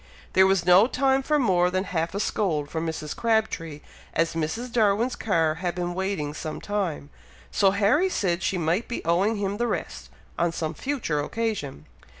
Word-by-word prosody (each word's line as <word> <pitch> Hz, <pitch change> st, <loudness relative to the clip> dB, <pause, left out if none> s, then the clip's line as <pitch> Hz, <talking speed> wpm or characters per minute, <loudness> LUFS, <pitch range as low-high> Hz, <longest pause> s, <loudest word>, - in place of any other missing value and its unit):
There 190 Hz, 0 st, +6 dB
was 190 Hz, -3 st, +2 dB
no 180 Hz, +5 st, +7 dB
time 270 Hz, +1 st, +2 dB
for 300 Hz, +3 st, +1 dB
more 180 Hz, -9 st, +3 dB
than 185 Hz, +1 st, 0 dB
half 170 Hz, -2 st, -2 dB
a -, -, -1 dB
scold 160 Hz, -9 st, -1 dB
from 165 Hz, 0 st, -2 dB
Mrs. 155 Hz, -2 st, -4 dB
Crabtree, 215 Hz, -10 st, -1 dB, 0.3 s
as 165 Hz, -, +1 dB
Mrs. 165 Hz, +10 st, -3 dB
Darwin's 225 Hz, +2 st, +2 dB
car 165 Hz, -7 st, +1 dB
had 175 Hz, -2 st, -1 dB
been 175 Hz, -1 st, -2 dB
waiting 185 Hz, -6 st, -2 dB
some 155 Hz, +1 st, -5 dB
time; 185 Hz, -8 st, -3 dB, 0.4 s
so 195 Hz, -, +4 dB
Harry 215 Hz, -, +3 dB
said 180 Hz, -, 0 dB
she 190 Hz, -, 0 dB
might 175 Hz, +6 st, 0 dB
be 235 Hz, -, -5 dB
owing 185 Hz, +7 st, +2 dB
him 200 Hz, 0 st, -2 dB
the 240 Hz, +1 st, 0 dB
rest, -, -, -4 dB, 0.3 s
on 170 Hz, 0 st, +2 dB
some 160 Hz, -1 st, -3 dB
future 240 Hz, -, -2 dB
occasion. 150 Hz, -, -3 dB
190 Hz, 175 wpm, -25 LUFS, 165-220 Hz, 0.4 s, no